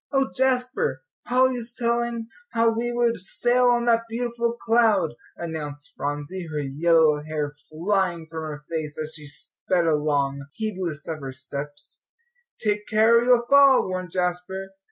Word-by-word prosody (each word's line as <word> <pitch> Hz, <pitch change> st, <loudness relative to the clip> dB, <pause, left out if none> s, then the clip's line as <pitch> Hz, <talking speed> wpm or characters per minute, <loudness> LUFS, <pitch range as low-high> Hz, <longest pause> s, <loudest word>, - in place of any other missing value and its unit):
"Oh, 270 Hz, -1 st, +1 dB
Jasper, 250 Hz, -, 0 dB, 0.2 s
Polly's 250 Hz, -1 st, +1 dB
telling 235 Hz, -1 st, -1 dB, 0.3 s
how 230 Hz, 0 st, +4 dB
we 235 Hz, +2 st, -1 dB
would 240 Hz, -1 st, +1 dB
sail 240 Hz, +6 st, +2 dB
on 240 Hz, -1 st, +3 dB
that 230 Hz, -1 st, +3 dB
beautiful 235 Hz, 0 st, -1 dB
cloud," 225 Hz, -8 st, +2 dB, 0.2 s
announced 150 Hz, -3 st, -6 dB
Phronsie, 145 Hz, +5 st, -4 dB
her 150 Hz, -, -3 dB
yellow 150 Hz, +2 st, +3 dB
hair 150 Hz, -1 st, -3 dB, 0.2 s
flying 175 Hz, 0 st, 0 dB
from 160 Hz, 0 st, -6 dB
her 150 Hz, -1 st, -6 dB
face 155 Hz, -3 st, -4 dB
as 155 Hz, 0 st, -4 dB
she 150 Hz, -2 st, -9 dB
sped 175 Hz, +4 st, -2 dB
along, 145 Hz, -3 st, 0 dB
heedless 185 Hz, -8 st, -4 dB
of 160 Hz, -2 st, -4 dB
her 135 Hz, -2 st, -6 dB
steps. 145 Hz, +2 st, -7 dB, 0.6 s
"Take 210 Hz, -1 st, -1 dB
care 220 Hz, +2 st, +5 dB
or -, -, 0 dB
you'll 245 Hz, -1 st, +4 dB
fall," 280 Hz, -1 st, +6 dB
warned 185 Hz, -1 st, -4 dB
Jasper. 180 Hz, +2 st, -2 dB
185 Hz, 145 wpm, -24 LUFS, 150-235 Hz, 0.6 s, fall